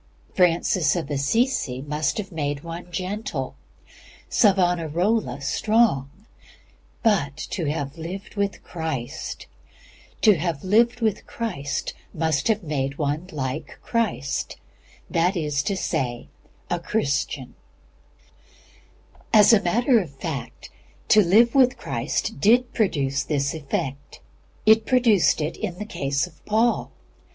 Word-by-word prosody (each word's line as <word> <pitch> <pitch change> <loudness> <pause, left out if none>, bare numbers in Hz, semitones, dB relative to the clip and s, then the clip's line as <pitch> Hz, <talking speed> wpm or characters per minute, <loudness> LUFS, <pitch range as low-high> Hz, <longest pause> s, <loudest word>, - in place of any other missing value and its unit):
Francis 175 -3 +3
Assisi 155 - 0
must 150 0 -1
have 195 -3 -4
made 145 -3 -3
one 170 +1 -8
gentle; 185 +6 -3 0.8
Savonarola, 180 -1 +2
strong. 210 - +2 0.9
But 165 - +2
to 170 - -2
have 145 0 -4
lived 185 +5 -7
with 200 -1 -2
Christ 160 -8 -5 0.7
must 185 - 0
have 220 -3 +1
made 140 -3 -2
one 150 +4 -2
like 130 -4 -4
Christ: 220 - -1 0.5
that 175 +3 +1
is 150 -3 0
to 195 +6 -2
say, 130 -9 -2 0.4
A 175 - +1
Christian. 140 - -2 1.8
As 215 +2 +7
a 210 - +5
matter 240 +7 +3
of 180 -7 -4
fact, 135 -4 -6 0.4
to 215 - +7
live 215 +6 +5
with 255 -2 +4
Christ 120 +3 -3
did 240 - +4
produce 140 - +1
this 140 -2 -1
effect. 140 -2 -4 0.5
It 220 0 +5
produced 230 -10 +4
it 150 +2 -2
in 185 -5 -4
the 210 - -5
case 140 -6 -1
of 170 -4 -17
Paul. 225 +3 +2
170 Hz, 105 wpm, -24 LUFS, 145-215 Hz, 1.8 s, As